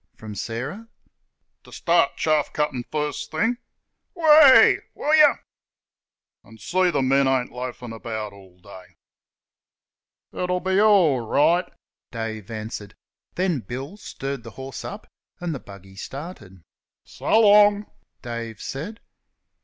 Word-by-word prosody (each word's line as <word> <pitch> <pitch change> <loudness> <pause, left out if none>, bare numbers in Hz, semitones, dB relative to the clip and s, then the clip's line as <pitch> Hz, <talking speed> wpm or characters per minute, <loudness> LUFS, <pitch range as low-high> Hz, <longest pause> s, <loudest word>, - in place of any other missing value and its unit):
from 110 -1 -9
Sarah) 130 - -5 0.8
"ter - - -17
start 170 -4 +1
chaff 155 -2 +1
cuttin' 150 -5 -1
first 150 -1 -3
thing 225 +10 0 0.6
WEH! 305 -5 +7 0.2
Will 300 - -1
yer 305 -2 +6 1.0
an' 110 0 -16
see 180 - +1
th' 145 -5 0
men 135 +1 +3
ain't 130 -2 0
loafin' 125 -1 -7
about 110 -2 -6
all 95 -2 -17
day." 95 0 -14 1.4
"It'll 180 0 -1
be 190 +2 0
orl 195 -11 +4
right," 155 +10 +2 0.4
Dave 110 -3 -6
answered; 110 -2 -7 0.4
then 180 -5 0
Bill 130 - -7
stirred 140 - -6
the 115 - -10
horse 135 -1 -7
up, - - -8 0.3
and 175 -2 -3
the 140 - -5
buggy 95 -2 -14
started. 105 - -9 0.4
"So 220 - 0
long!" 205 -1 +5 0.4
Dave 115 -3 -6
said. 175 +12 -6
135 Hz, 120 wpm, -23 LUFS, 115-180 Hz, 1.4 s, WEH